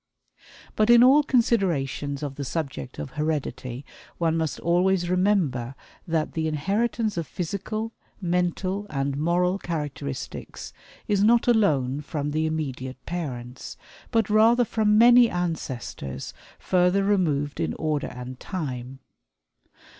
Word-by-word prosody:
But 215 +1 +2
in 240 0 +8
all 270 +4 +7
considerations 170 - 0
of 145 -2 -3
the 140 - -5
subject 135 - -4
of 75 - -6
heredity, 145 -4 -3 0.3
one 165 -1 +1
must 160 -2 -2
always 175 +1 +2
remember 170 - +1 0.3
that 160 -2 0
the 160 -1 -1
inheritance 205 +7 -1
of 165 -3 -2
physical, 210 +5 -4 0.3
mental, 185 +2 -1
and 135 -1 -1
moral 175 +5 +1
characteristics 150 - -5 0.3
is 205 -1 +2
not 235 +3 +4
alone 150 - +2
from 145 -1 -3
the 155 +1 0
immediate 135 -5 -4
parents, 130 -8 -6 0.3
but 225 -3 +2
rather 225 +3 +5
from 215 -1 +2
many 240 +1 +7
ancestors 150 - -4 0.2
further 180 +2 +2
removed 155 -8 +1
in 80 -1 -1
order 155 -2 -1
and 125 +1 -8
time. 130 -7 -5
165 Hz, 120 wpm, -25 LUFS, 140-200 Hz, 0.3 s, in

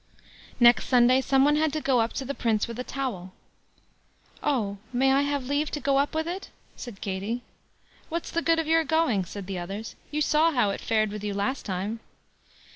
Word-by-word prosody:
Next 240 0 +6
Sunday 250 +1 +5
some 270 0 +3
one 295 +1 +3
had 310 0 +2
to 310 - 0
go 260 -5 +2
up 225 - 0
to 270 - -4
the 280 - -3
Prince 225 -5 0
with 235 +1 -7
a - - -2
towel. 225 -11 -4 1.1
"Oh! 210 -8 -1
may 265 +2 +3
I 275 - +4
have 285 -2 -1
leave 290 +3 0
to 295 - -4
go 275 0 +2
up 285 +2 0
with 320 +1 -1
it?" 365 +3 -5 0.3
said 235 -6 -9
Katie. 205 +5 -3 0.7
"What's 335 +1 -4
the 335 - 0
good 330 0 +2
of 325 - 0
your 325 +1 +3
going?" 310 - +1
said 200 +3 -7
the 190 -1 -4
others; 195 +5 -6 0.2
"you 300 - -2
saw 310 +2 +3
how 230 -7 +2
it - - -5
fared 215 -2 +1
with 210 0 -6
you 205 -1 -3
last 205 +8 -2
time." 200 +4 -3
255 Hz, 205 wpm, -26 LUFS, 210-290 Hz, 1.1 s, Next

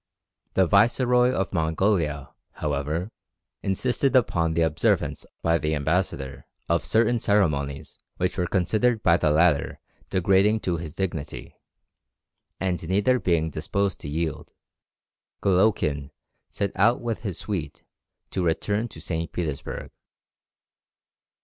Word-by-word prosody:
The 95 - +5
Viceroy 125 +6 +4
of 95 -6 -2
Mongolia, 80 -3 0 0.2
however, 75 +6 -2 0.5
insisted 125 +7 0
upon 85 -10 +2
the 85 - +3
observance 80 -2 0 0.2
by 85 0 +3
the 75 +1 0
ambassador 75 -3 -2 0.2
of 85 0 +1
certain 115 +1 +2
ceremonies 75 -9 0 0.2
which 90 - -1
were 90 -2 0
considered 110 +6 +1
by 85 -1 +5
the 80 - +1
latter 80 -1 +2 0.3
degrading 100 +3 +3
to 85 -2 -1
his 80 -2 -7
dignity; 85 -6 -4 1.0
and 90 -2 -1
neither 105 +7 +3
being 80 -5 +1
disposed 100 +6 -1
to 70 - -7
yield, 80 0 -3 0.9
Golowkin 90 -8 +2 0.4
set 100 -1 -2
out 115 +6 +3
with 115 -2 -3
his 100 -6 -4
suite 85 -9 -5 0.5
to 95 - -1
return 100 +7 0
to - - -12
St. 80 -1 -3
Petersburg. 75 -6 -4
90 Hz, 120 wpm, -25 LUFS, 80-100 Hz, 1.0 s, The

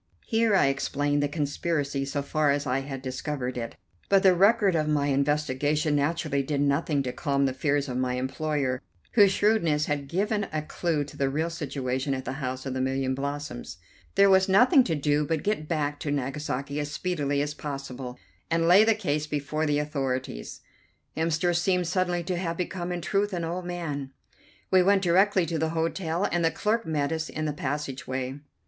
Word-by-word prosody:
Here 225 -2 +2
I - - +5
explained 145 +1 0
the 145 - +2
conspiracy 145 -1 -1
so 140 +1 -2
far 150 +1 +1
as 140 +1 +1
I 130 0 +1
had 135 -1 -6
discovered 130 -1 -3
it, 115 -1 -5 0.3
but 195 0 +4
the 190 -1 +7
record 200 +2 +4
of 155 -2 +1
my 150 -2 +1
investigation 145 +2 +1
naturally 145 -1 0
did 140 +1 -2
nothing 140 0 +1
to 125 -1 -3
calm 140 -3 0
the 130 - 0
fears 140 +1 0
of 125 -1 -3
my 125 -1 0
employer, 130 0 -1 0.3
whose 205 -4 +6
shrewdness 190 -8 +2
had 145 -2 -2
given 205 - 0
a 155 -1 -2
clue 155 -1 -1
to 145 - -11
the 135 -1 0
real 160 +5 -1
situation 135 -4 -2
at 130 0 -6
the - - -3
House 130 0 -3
of 135 - -3
the 130 - -2
Million 130 0 0
Blossoms. 140 - -5 0.4
There 200 - +6
was 190 0 +5
nothing 250 - +6
to 165 - 0
do 145 0 +1
but 160 0 -1
get 205 -7 -1
back 150 -3 -1
to 150 - -4
Nagasaki 140 0 -2
as 145 -1 -2
speedily 150 -4 -1
as 145 0 -3
possible, 135 -4 -6 0.3
and 165 0 +2
lay 185 +5 +8
the 225 0 +4
case 150 -8 -1
before 150 +1 -2
the 145 0 +2
authorities. 135 - -3 0.5
Hemster 165 +2 +1
seemed 180 +1 +1
suddenly 180 0 0
to 180 +1 -2
have 170 -2 -2
become 180 0 -3
in 175 -1 -3
truth 200 +4 0
an 175 -2 -2
old 175 +2 -4
man. 150 -6 -4 0.6
We 185 -1 +6
went 195 +1 +3
directly 190 +1 +4
to 165 0 -2
the 160 +1 0
hotel, 165 +1 -1
and 170 +1 +1
the 165 - +4
clerk 210 +7 -1
met 150 -2 0
us 160 0 -2
in 155 - -3
the 150 - -1
passage 140 -2 -4
way. 130 0 -2
"Mr. 140 - -9
150 Hz, 195 wpm, -27 LUFS, 140-175 Hz, 0.6 s, lay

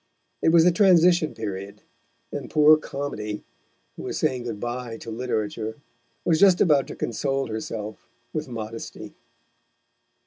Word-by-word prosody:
It - - +4
was 165 0 +6
the 180 - +5
transition 175 -3 +4
period, 100 -1 -6 0.5
and - - -5
poor 155 0 +7
Comedy, 135 -9 -5 0.5
who - - -8
was - - -4
saying 125 -2 0
good 115 -4 -4
bye 120 0 -4
to 115 - -8
literature, 110 -1 -3 0.5
was 160 -2 +3
just 190 -2 +6
about 150 -7 +4
to - - -7
console 135 +3 -1
herself 110 -1 -6 0.3
with 155 -2 -3
modesty. 115 -1 -7
125 Hz, 135 wpm, -25 LUFS, 110-155 Hz, 0.5 s, poor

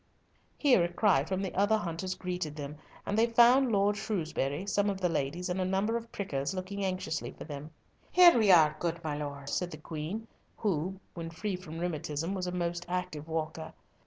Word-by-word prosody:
Here 255 - +5
a 170 - -1
cry 180 -7 +3
from 190 +2 -2
the 190 - -3
other 205 +3 +3
hunters 185 -1 -3
greeted 180 -5 -4
them, 150 0 -6 0.3
and 205 - -1
they 225 +2 +4
found 240 +2 +6
Lord 205 0 +3
Shrewsbury, 165 -6 -2
some 205 0 +1
of 195 -1 -2
the 180 -2 +1
ladies, 165 +4 -2
and 185 +1 -1
a - - +2
number 195 +4 +1
of 230 0 -4
prickers, 150 -4 -3
looking 190 +2 -4
anxiously 185 -4 -2
for - - -9
them. 150 0 -7 0.4
"Here 355 -1 +8
we 220 -4 +4
are, 155 -4 +6
good 170 -1 -1
my 155 -2 -2
lord," 140 -2 -5
said 180 +3 -1
the 155 - -8
Queen, 160 +8 -5 0.3
who, 190 -2 -1
when 165 -1 -5
free 185 +4 -3
from 175 -3 -8
rheumatism, 165 0 -2
was 185 -2 -2
a - - -2
most 175 -1 -2
active 180 -4 -3
walker. 160 0 -4
180 Hz, 195 wpm, -31 LUFS, 160-200 Hz, 0.4 s, Here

